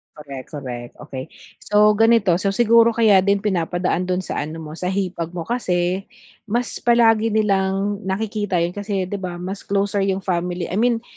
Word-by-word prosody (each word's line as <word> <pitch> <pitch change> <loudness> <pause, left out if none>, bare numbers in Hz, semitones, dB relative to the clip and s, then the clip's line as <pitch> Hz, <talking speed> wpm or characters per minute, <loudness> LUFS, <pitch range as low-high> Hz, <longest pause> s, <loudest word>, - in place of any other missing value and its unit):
Korek, 140 -4 -9
korek, 120 -4 -6
okey. 130 -3 -7 0.3
So 210 0 +4
ganito, 225 -6 +4
so 195 +1 -1
siguro 230 +1 +5
kaya 220 -4 +5
din 200 +1 +2
pinapadaan 180 -2 0
dun 185 0 -1
sa - - -4
ano 160 +2 -5
mo, 155 -1 -8
sa 180 - -3
hipag 180 -3 -2
mo, 175 - -3
kasi 185 -3 -1 0.4
mas 240 +3 -2
palagi 225 -2 +3
nilang 195 -1 +1
nakikita 205 -2 -1
'yun, 170 - 0
kasi 195 -1 -3
'di 205 - -3
ba, 180 -2 -5
mas 195 +2 -6
closer 200 0 0
'yung 195 0 -1
family 175 -1 -2
i 190 - -1
mean 235 0 +2
195 Hz, 170 wpm, -21 LUFS, 175-210 Hz, 0.4 s, siguro